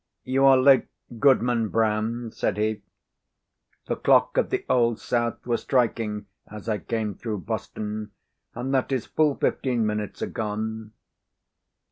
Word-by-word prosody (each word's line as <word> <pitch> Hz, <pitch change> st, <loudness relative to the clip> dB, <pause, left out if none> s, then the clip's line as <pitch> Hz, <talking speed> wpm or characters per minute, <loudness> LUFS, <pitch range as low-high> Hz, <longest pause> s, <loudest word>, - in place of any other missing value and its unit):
"You 135 Hz, +1 st, +2 dB
are 135 Hz, -1 st, +7 dB
late, 130 Hz, 0 st, +5 dB, 0.3 s
Goodman 120 Hz, -4 st, +3 dB
Brown," 110 Hz, +2 st, 0 dB
said 105 Hz, -, -2 dB
he. 110 Hz, 0 st, -1 dB, 1.0 s
"The -, -, -1 dB
clock -, -, +3 dB
of -, -, +2 dB
the -, -, -2 dB
Old 120 Hz, -2 st, +2 dB
South 120 Hz, -1 st, -2 dB
was 120 Hz, -1 st, 0 dB
striking 115 Hz, -5 st, 0 dB, 0.2 s
as 105 Hz, +1 st, -10 dB
I 110 Hz, -2 st, 0 dB
came 110 Hz, +3 st, -2 dB
through 105 Hz, -3 st, -5 dB
Boston, 105 Hz, +5 st, -4 dB, 0.5 s
and 135 Hz, +2 st, -3 dB
that 130 Hz, 0 st, +1 dB
is 130 Hz, -3 st, -1 dB
full 150 Hz, -3 st, +1 dB
fifteen 120 Hz, -4 st, 0 dB
minutes 105 Hz, -1 st, -3 dB
agone." 110 Hz, 0 st, -4 dB
115 Hz, 135 wpm, -25 LUFS, 105-125 Hz, 1.0 s, are